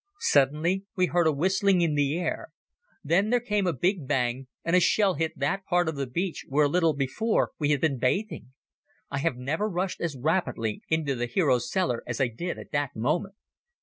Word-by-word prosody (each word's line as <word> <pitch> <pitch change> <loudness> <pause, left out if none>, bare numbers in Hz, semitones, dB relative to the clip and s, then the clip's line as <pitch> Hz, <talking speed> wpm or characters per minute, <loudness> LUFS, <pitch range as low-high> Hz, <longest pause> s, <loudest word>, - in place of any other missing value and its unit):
Suddenly 150 +7 +2
we 185 -2 +3
heard 175 -1 +2
a - - +4
whistling 190 +5 +2
in 165 -3 +2
the 145 +1 +1
air; 175 - -3 0.6
then 180 +8 +2
there 245 +1 +3
came 210 -5 0
a - - +3
big 170 - -1
bang 130 -1 -1 0.2
and 170 +2 +2
a - - +7
shell 195 +2 +3
hit 160 +1 -2
that 145 +8 -1
part 175 -1 +2
of 160 - -2
the 140 -1 -3
beach 170 +8 -3
where 145 +2 +3
a - - +4
little 165 +1 +2
before 145 - 0
we 145 -2 +1
had 145 -3 +2
been 140 -5 +1
bathing. 130 - -1 0.6
I 145 - -2
have 140 -3 0
never 160 +12 -1
rushed 185 0 -3
as 160 -5 -2
rapidly 130 - -1
into 160 -3 +1
the 120 -1 -2
hero's 125 -3 +1
cellar 180 -11 0
as 120 -2 -3
I 130 -3 +2
did 170 +10 -5
at - - -11
that 145 -3 -1
moment. 160 - -1
160 Hz, 205 wpm, -27 LUFS, 135-180 Hz, 0.6 s, a